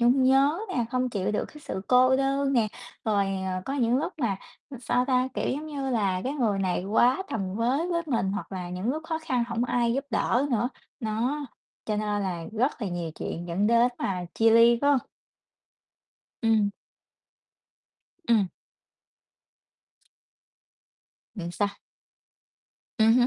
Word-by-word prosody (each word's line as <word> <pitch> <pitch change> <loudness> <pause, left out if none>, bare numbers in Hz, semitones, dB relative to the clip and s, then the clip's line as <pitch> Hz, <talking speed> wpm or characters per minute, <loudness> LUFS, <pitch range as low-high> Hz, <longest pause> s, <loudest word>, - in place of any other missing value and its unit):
nhung 245 +3 +4
nhớ 275 +5 +4
nè, 245 -10 0
không 255 0 0
chịu 205 -1 -1
được - - 0
cái 300 - -14
sự 190 - -5
cô 255 +1 +5
đơn 275 +1 +1
nè. 230 -4 +3 0.4
Rồi, 205 -2 +2
à, 190 -1 -2
có 270 - -3
những 245 -2 +2
lúc 335 +5 -2
mà, 225 -9 0 0.4
sao 250 +1 +1
ta, 255 -1 +2
kiểu, - - -1
giống 295 +4 -3
như 275 -3 -3
là, 195 -6 +1
cái 265 - -1
người 225 -9 0
này 185 -1 0
quá 240 - +3
tầm 195 -3 -2
với 260 +10 +1
với 335 -1 0
mình 230 -9 0
hoặc 200 0 -5
là 180 -2 -5
những 185 +6 -2
lúc 310 +4 -3
khó 320 0 -2
khăn 255 -6 0
hổng 235 +1 0
ai 240 -1 +1
giúp 275 +2 -1
đỡ 240 +4 +1
nữa, 240 +1 +1 0.3
nó, 245 +7 -1 0.4
cho 215 - -1
nên 210 -1 -1
là 175 -4 -3
rất 245 +2 0
là 205 - -1
nhiều 175 -2 -3
chuyện 170 +1 -5
dẫn 190 +5 +1
đến 235 +1 +5
mà 180 -2 -2
chia 225 0 +4
ly, 230 +1 +6
phải 285 - +4
hông? 280 - +5 1.4
Ừm. 220 -3 +3 1.6
Ừm. 220 -4 +4 2.9
Ừm, 175 -4 -5
sao? 205 +2 +1 1.3
Ừm 220 +1 +6
hứm. 245 0 +5
235 Hz, 165 wpm, -27 LUFS, 205-265 Hz, 2.9 s, ly